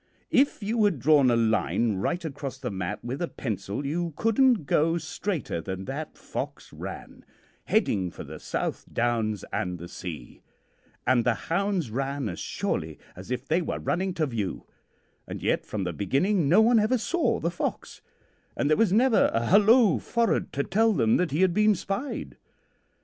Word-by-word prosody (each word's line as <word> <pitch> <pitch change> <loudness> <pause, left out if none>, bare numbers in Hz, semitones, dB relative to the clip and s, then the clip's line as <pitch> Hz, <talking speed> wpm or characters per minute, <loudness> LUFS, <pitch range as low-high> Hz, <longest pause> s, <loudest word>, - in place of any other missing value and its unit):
If 265 -4 +2
you 220 +2 +1
had 195 -7 +2
drawn 140 0 +5
a 120 - +3
line 115 -1 +1
right 170 - -2
across 140 -3 -5
the 130 -4 -4
map 95 +1 -4
with 130 +5 -4
a 175 - 0
pencil 110 - -4
you 165 +3 -2
couldn't 225 - +3
go 165 +4 +2
straighter 165 - -3
than 95 +1 -5
that 145 +4 -6
fox - - -6
ran, - - -8 0.4
heading 95 -3 +1
for - - -9
the - - -9
South - - -3
Downs 115 -4 0
and 90 -1 -2
the 85 +1 -8
sea, 85 -3 -8 0.6
and 125 -2 +3
the 120 -1 +2
hounds 180 - -1
ran 135 0 -2
as 85 - -6
surely - - -3 0.2
as 95 +4 -11
if 125 +2 -3
they 165 +3 +2
were - - -3
running 185 0 -1
to 160 -4 +1
view, 115 -8 -4 0.6
and - - -7
yet - - 0
from 105 -3 -3
the 90 -1 -3
beginning 140 - +1
no 190 +7 +6
one 230 +1 +5
ever 220 +4 +2
saw 345 +8 0
the 170 +3 -1
fox, 175 - -4 0.6
and 145 - +1
there 155 - +4
was 225 -5 +3
never 230 +3 +4
a 115 0 0
hallo 215 +3 +5
forrard 235 -1 0
to 140 - 0
tell 220 +6 +2
them 115 - +3
that 180 - +1
he 150 +6 0
had 185 -2 +4
been 210 +2 +4
spied. 195 - -4
150 Hz, 175 wpm, -27 LUFS, -, 0.6 s, no